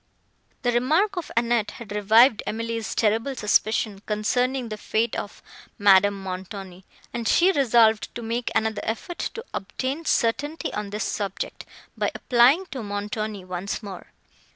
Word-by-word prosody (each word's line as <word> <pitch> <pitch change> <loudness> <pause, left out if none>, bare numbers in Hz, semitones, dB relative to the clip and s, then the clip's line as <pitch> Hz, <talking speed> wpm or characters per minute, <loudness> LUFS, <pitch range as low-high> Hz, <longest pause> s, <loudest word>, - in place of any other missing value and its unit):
The 245 - +2
remark 315 - +2
of 350 -4 -4
Annette 230 -2 +2
had 235 -3 -10
revived 220 +3 +5
Emily's 230 0 -3
terrible 225 +5 +1
suspicion, 210 -2 +1
concerning 245 +4 0
the 215 - -5
fate 220 +2 0
of 205 - -6 0.3
Madame 200 0 +4
Montoni; 190 0 -7 0.3
and 235 -2 -3
she 360 +10 +5
resolved 235 - +3
to 235 - -5
make 230 +2 -2
another 220 -1 0
effort 230 +10 -4 0.2
to 460 +1 -6
obtain 265 +10 -4
certainty 290 +7 0
on 210 -1 -4
this 210 +2 -3
subject, 200 -2 -4 0.3
by - - 0
applying 255 +9 +4
to 265 - -4
Montoni 205 -1 -4
once 185 +4 -4
more. 195 -3 -8
220 Hz, 140 wpm, -24 LUFS, 205-245 Hz, 0.3 s, revived